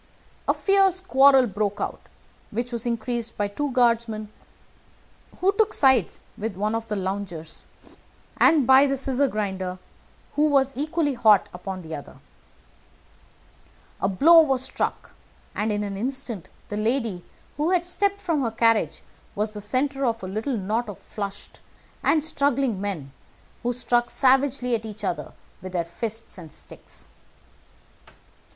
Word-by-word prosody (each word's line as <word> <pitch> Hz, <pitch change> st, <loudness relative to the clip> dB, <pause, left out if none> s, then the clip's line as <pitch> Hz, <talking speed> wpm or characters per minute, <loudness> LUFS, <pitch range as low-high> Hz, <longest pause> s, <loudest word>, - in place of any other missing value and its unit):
A -, -, +4 dB
fierce 390 Hz, -2 st, +3 dB
quarrel 270 Hz, -7 st, +5 dB
broke 205 Hz, -1 st, -2 dB
out -, -, -3 dB, 0.5 s
which 240 Hz, +3 st, -3 dB
was 235 Hz, 0 st, -3 dB
increased 235 Hz, 0 st, -3 dB
by 205 Hz, -, 0 dB
the 200 Hz, -, -15 dB
two 290 Hz, +4 st, -2 dB
guardsmen, 230 Hz, -4 st, +1 dB, 1.1 s
who 380 Hz, +2 st, +4 dB
took 435 Hz, +1 st, +1 dB
sides 265 Hz, -, +3 dB, 0.2 s
with 210 Hz, -3 st, -4 dB
one 210 Hz, +2 st, 0 dB
of 225 Hz, 0 st, -3 dB
the 215 Hz, -, -2 dB
loungers, 185 Hz, -5 st, -5 dB, 0.7 s
and 305 Hz, -5 st, +5 dB
by 265 Hz, +2 st, +7 dB
the 275 Hz, 0 st, 0 dB
scissors 270 Hz, +1 st, +1 dB
grinder, 190 Hz, -4 st, -3 dB, 0.6 s
who 300 Hz, +1 st, +3 dB
was 275 Hz, -1 st, +3 dB
equally 300 Hz, +1 st, 0 dB
hot 215 Hz, -4 st, +4 dB
upon 185 Hz, 0 st, -6 dB
the 160 Hz, 0 st, -8 dB
other 145 Hz, -2 st, -7 dB
side. -, -, -21 dB, 1.8 s
A 195 Hz, -, +2 dB
blow 325 Hz, -, +7 dB
was 270 Hz, -4 st, +1 dB
struck, -, -, -3 dB, 0.4 s
and 215 Hz, +1 st, -1 dB
in 205 Hz, 0 st, -1 dB
an 200 Hz, -1 st, -4 dB
instant 240 Hz, -3 st, -4 dB, 0.2 s
the 205 Hz, -, -3 dB
lady, 220 Hz, -4 st, -1 dB, 0.3 s
who 300 Hz, +3 st, +1 dB
had 360 Hz, -2 st, +2 dB
stepped 400 Hz, +3 st, 0 dB
from 330 Hz, -7 st, 0 dB
her 240 Hz, -, 0 dB
carriage, 225 Hz, -7 st, +1 dB, 0.3 s
was 210 Hz, +1 st, -1 dB
the 210 Hz, -, -6 dB
centre 270 Hz, +6 st, -1 dB
of 230 Hz, -4 st, 0 dB
a -, -, -4 dB
little 220 Hz, +6 st, -2 dB
knot 215 Hz, +4 st, -2 dB
of 205 Hz, -, -7 dB, 1.3 s
struggling 275 Hz, -8 st, +1 dB
men 175 Hz, -10 st, -4 dB, 0.5 s
who 245 Hz, -, 0 dB
struck 240 Hz, 0 st, +1 dB
savagely 265 Hz, -1 st, +2 dB
at 225 Hz, -1 st, 0 dB
each 215 Hz, -1 st, -8 dB
other -, -, -3 dB, 0.3 s
with 185 Hz, 0 st, -8 dB
their 170 Hz, -2 st, 0 dB
fists 220 Hz, +3 st, -6 dB
and 160 Hz, -3 st, -11 dB
sticks. -, -, -11 dB
235 Hz, 145 wpm, -24 LUFS, 205-275 Hz, 1.8 s, by